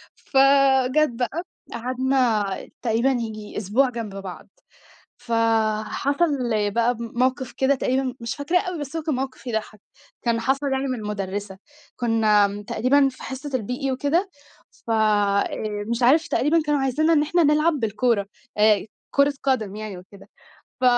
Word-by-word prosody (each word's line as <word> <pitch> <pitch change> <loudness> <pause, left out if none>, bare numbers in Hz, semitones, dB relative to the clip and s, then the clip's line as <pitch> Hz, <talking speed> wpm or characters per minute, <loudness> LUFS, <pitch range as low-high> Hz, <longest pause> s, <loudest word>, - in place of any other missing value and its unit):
فجَت 275 +1 +3
بقى 255 +8 -3 0.3
قعدنا 250 -3 +1 0.4
تقريبًا 235 +2 +1
ييجي 220 -4 -4
أسبوع 225 +6 +2
جنب 225 -5 -6
بعض، 195 -2 -8 0.7
فحصل 230 +6 +1 0.4
بقى 235 +2 +1
ب 235 - -9
موقف 255 +2 -1
كده 270 +1 +3
تقريبًا 260 0 -1
مش 230 - -4
فاكراه 330 +5 +1
أوي 360 -3 -5
بس 290 +2 -6
هو 325 - -1
كان 305 -4 -1
موقف 260 0 -5
يضحّك، 220 -2 -3 0.4
كان 230 -1 +1
حصل 275 +3 0
يعني 270 +1 -1
من 255 -3 -2
المُدرّسة، 200 -1 -4 0.4
كنّا 220 -4 +3
م 205 +1 -7
تقريبًا 270 +6 +2
في 255 - -13
حصة 270 +2 -6
الBE 255 +2 -2
وكده 320 +9 0 0.6
ف - - -1
آآ، 210 -1 +1
مش 235 +1 -1
عارف 305 +7 +4
تقريبًا 315 +4 +2
كانوا 295 -1 +1
عايزينا 300 +5 +2
إن 295 - +4
إحنا 340 +2 +2
نلعب 305 +3 +3
بالكورة 225 -4 0 0.3
آآ، 210 -1 +4 0.3
كورة 280 0 +3
قدم 220 -7 0
يعني 215 -3 -6
وكده، 190 +2 -15 0.5
ف - - -4
250 Hz, 145 wpm, -23 LUFS, 215-275 Hz, 0.7 s, عارف